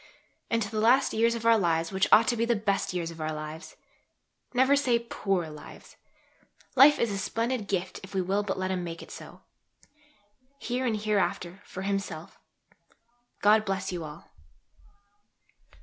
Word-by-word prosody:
and 230 -1 +1
to 200 - -6
the 215 - -2
last 250 +5 +4
years 230 +1 +2
of 230 -1 -6
our 230 -1 +5
lives 165 -3 0
which 190 0 +1
ought 225 - +7
to 240 - +2
be 230 - 0
the 235 0 +2
best 205 -2 -1
years 170 -2 -3
of 165 -1 -10
our 155 0 -2
lives. 155 +1 -7 0.8
Never 260 +2 +4
say 260 -4 +2
"poor 195 -7 -2
lives." 150 -1 -12 0.8
Life 280 +3 +8
is 235 - 0
a 200 - -3
splendid 230 +1 -2
gift 185 -1 -2
if 195 +1 -11
we 190 - +2
will 195 +3 0
but 200 -2 -3
let 185 0 -2
Him 185 -1 -2
make 165 -1 -6
it - - -13
so, - - -11 1.2
here 255 -1 -2
and 220 -2 0
hereafter, 195 -3 -1
for 190 - -7
Himself. 195 -5 -4 1.0
God 215 +1 +5
bless 195 -1 -2
you 175 -2 -4
all. 150 +1 -11
200 Hz, 170 wpm, -28 LUFS, 180-230 Hz, 1.2 s, Life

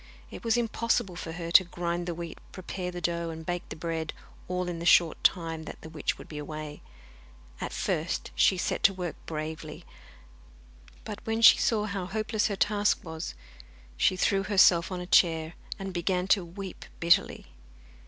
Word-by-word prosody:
It - - -9
was 230 0 +2
impossible 230 -4 0
for 165 -1 -6
her 170 -1 -5
to 185 - +8
grind 175 0 -3
the 170 - -2
wheat, 170 -1 -7
prepare 185 -1 -5
the 175 0 -6
dough, 170 0 -1
and 160 0 -7
bake 175 0 -3
the - - -6
bread, 160 -1 -3 0.3
all 180 0 -2
in 175 -1 -4
the - - -5
short 170 -3 +5
time 165 -3 +1
that - - -8
the 160 - -9
witch 155 -3 -2
would - - -11
be 150 - -7
away. 150 0 -7 0.8
At - - -3
first - - -2
she 190 - +4
set - - -1
to 195 - +5
work 180 -3 -4
bravely, 155 0 -6 1.2
but 210 0 -6
when 225 +1 -1
she - - +9
saw 215 -2 +1
how 200 -3 -3
hopeless 215 +2 0
her 205 - -2
task 205 +1 +1
was, 160 - -6 0.6
she 185 - +3
threw 195 +1 +2
herself 190 -3 +4
on 180 -1 -3
a - - -5
chair, 165 -3 +3 0.2
and 195 -1 -6
began 180 +1 0
to 195 -2 +4
weep 185 +2 -8
bitterly. 170 0 +3
175 Hz, 180 wpm, -28 LUFS, 165-195 Hz, 1.2 s, she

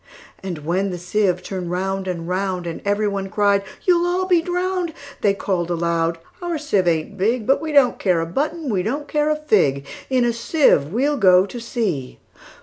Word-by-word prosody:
And 175 -6 -6
when 185 +4 0
the 180 - -4
sieve 180 0 0
turn'd 185 -3 -5
round 190 +2 -2
and 170 -2 -4
round, 185 -1 -2
And 165 -1 -5
every 205 +1 +1
one 195 -1 -3
cried, 200 -1 +2 0.2
"You 355 -2 +4
'll 355 +1 0
be 355 -3 +3
drown'd!"They 350 - -2
call'd 180 -4 -2
aloud, 170 -1 0 0.2
"Our 345 -2 -2
sieve 205 -12 0
ain't 160 0 -1
big:But 230 +6 +1
we 320 -1 -3
don't 280 -4 +4
care 180 -4 +2
a 165 - -1
button; 300 - -2
we 190 -3 +1
don't 280 +9 -3
care 300 0 +1
a 305 - +2
fig:In 230 - 0
a 235 - +1
sieve 230 - +2
we 250 +7 +1
'll 295 -1 0
go 185 -4 +5
to 240 +5 -8
sea!" 210 - -3
200 Hz, 185 wpm, -21 LUFS, 180-285 Hz, 0.2 s, go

